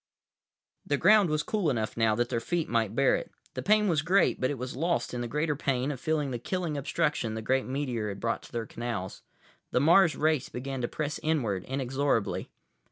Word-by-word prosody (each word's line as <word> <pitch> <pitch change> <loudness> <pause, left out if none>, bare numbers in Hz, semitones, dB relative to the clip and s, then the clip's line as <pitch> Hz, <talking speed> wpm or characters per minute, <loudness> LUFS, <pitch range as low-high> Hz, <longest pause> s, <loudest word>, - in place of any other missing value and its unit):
———— - - -65 0.3
The 145 - +1
ground 205 +1 +5
was 155 0 0
cool 205 -7 0
enough 110 -5 -1
now 115 -2 +2
that 120 +1 0
their 115 - 0
feet 170 +6 -1
might 115 -2 0
bear 135 0 +4
it. - - -5 0.2
The - - -4
pain 210 +1 +3
was 160 -5 +2
great, 180 +5 +2
but 130 - +2
it 145 - -3
was 125 +1 -5
lost 170 +1 -1
in 120 - -3
the 120 - -2
greater 150 +4 0
pain 135 -1 0
of 135 - -6
feeling 150 -1 -1
the 120 - -3
killing 175 +3 -2
obstruction 140 -4 -1
the 110 - -4
great 130 +4 +1
meteor 130 -5 -2
had 100 - -6
brought 115 0 -1
to - - -14
their 115 -1 -3
canals. 115 -5 -5 0.5
The - - +1
Mars 165 +3 +5
race 155 -3 +1
began 135 +1 -5
to 120 - 0
press 150 +2 -3
inward, 115 - 0
inexorably. 135 -3 -1
135 Hz, 215 wpm, -29 LUFS, 120-155 Hz, 0.5 s, ground